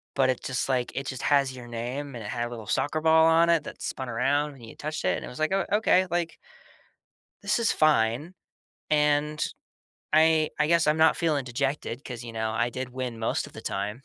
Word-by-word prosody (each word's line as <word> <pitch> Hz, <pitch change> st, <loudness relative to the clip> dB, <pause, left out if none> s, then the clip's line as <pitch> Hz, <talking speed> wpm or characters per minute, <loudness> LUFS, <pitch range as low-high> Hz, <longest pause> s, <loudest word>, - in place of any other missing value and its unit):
But 135 Hz, -2 st, +3 dB
it 130 Hz, -, 0 dB
just, 130 Hz, +1 st, -2 dB
like, 125 Hz, -2 st, 0 dB
it 135 Hz, +1 st, -3 dB
just 130 Hz, -2 st, -5 dB
has 140 Hz, -2 st, +3 dB
your 125 Hz, -2 st, -10 dB
name 125 Hz, +4 st, -5 dB
and 115 Hz, -, -7 dB
it -, -, -6 dB
had 120 Hz, -1 st, -2 dB
a -, -, -9 dB
little 115 Hz, -3 st, -8 dB
soccer 155 Hz, +2 st, 0 dB
ball 160 Hz, 0 st, +5 dB
on 165 Hz, +1 st, +5 dB
it 165 Hz, -3 st, +3 dB
that -, -, -9 dB
spun 130 Hz, -, -4 dB
around 140 Hz, +5 st, 0 dB
when 135 Hz, -, -16 dB
you 115 Hz, -, -11 dB
touched 155 Hz, +1 st, -5 dB
it. 90 Hz, -, +1 dB
And -, -, -7 dB
it -, -, -8 dB
was 125 Hz, -, -9 dB
like, 155 Hz, +2 st, +1 dB
"Oh, 195 Hz, 0 st, +1 dB
okay, 185 Hz, -3 st, +3 dB
like, 170 Hz, -1 st, -2 dB, 1.0 s
this -, -, +1 dB
is 230 Hz, -2 st, +2 dB
fine. 150 Hz, +2 st, +2 dB, 0.6 s
And 150 Hz, 0 st, +2 dB, 0.7 s
I 155 Hz, 0 st, +4 dB
I 150 Hz, -, +3 dB
guess 170 Hz, -2 st, +3 dB
I'm 150 Hz, -, +3 dB
not 160 Hz, 0 st, +5 dB
feeling 155 Hz, -5 st, 0 dB
dejected 135 Hz, +1 st, -3 dB
'cause, 120 Hz, -2 st, -7 dB
you 115 Hz, -, -8 dB
know, 110 Hz, 0 st, -2 dB
I 120 Hz, +2 st, 0 dB
did 130 Hz, +1 st, -5 dB
win 125 Hz, -2 st, -5 dB
most 115 Hz, -, -1 dB
of -, -, -15 dB
the -, -, -9 dB
time." 105 Hz, +5 st, -3 dB
140 Hz, 225 wpm, -27 LUFS, 120-155 Hz, 1.0 s, ball